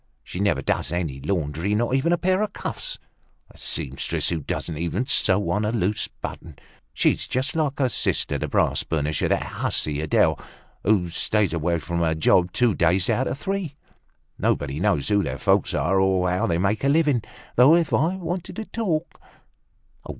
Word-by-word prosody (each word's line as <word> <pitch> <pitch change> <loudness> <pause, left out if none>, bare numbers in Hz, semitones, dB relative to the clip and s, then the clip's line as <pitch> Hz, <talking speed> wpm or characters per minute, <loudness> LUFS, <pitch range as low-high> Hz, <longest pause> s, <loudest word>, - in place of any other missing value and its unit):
"She 90 - -7
never 100 -9 +1
does - - -1
any 85 -6 -2
laundry, 80 +4 -1
not 120 +3 0
even 135 +6 +2
a 175 - +3
pair 185 +3 +1
of 215 -2 -2
cuffs. - - -5 0.5
A - - -19
seamstress 70 -4 -1
who 85 - -1
doesn't 80 +2 -4
even 90 +8 -1
sew 105 -6 +3
on 105 - 0
a 105 - 0
loose 105 -2 0
button! - - -9 0.3
She's - - +1
just 130 +4 -2
like 150 -3 0
her 135 - +2
sister, 120 - 0
the - - -2
brass - - +1
burnisher, 75 -1 -1
that - - +1
hussy 75 -1 -2
Adele, 80 - +2 0.4
who 95 -4 +2
stays 100 +2 0
away 85 +1 0
from 85 +1 -3
her 80 -1 +1
job 90 +3 +3
two 120 0 +2
days 90 +2 +2
out 130 - +1
of - - -3
three. 190 -4 -3 0.6
Nobody 70 +1 0
knows 95 -6 +1
who 100 -1 +3
their - - -3
folks - - +2
are 95 +4 +2
or 95 -1 +2
how 90 - 0
they 85 - +1
make 100 +6 0
a 140 - +3
living. 145 -5 +3 0.3
Though, 130 +7 +7
if 170 -2 +1
I 165 +6 +2
wanted 175 -1 -5
to 220 - -5
talk 170 -9 -3
100 Hz, 180 wpm, -24 LUFS, 85-140 Hz, 0.6 s, Though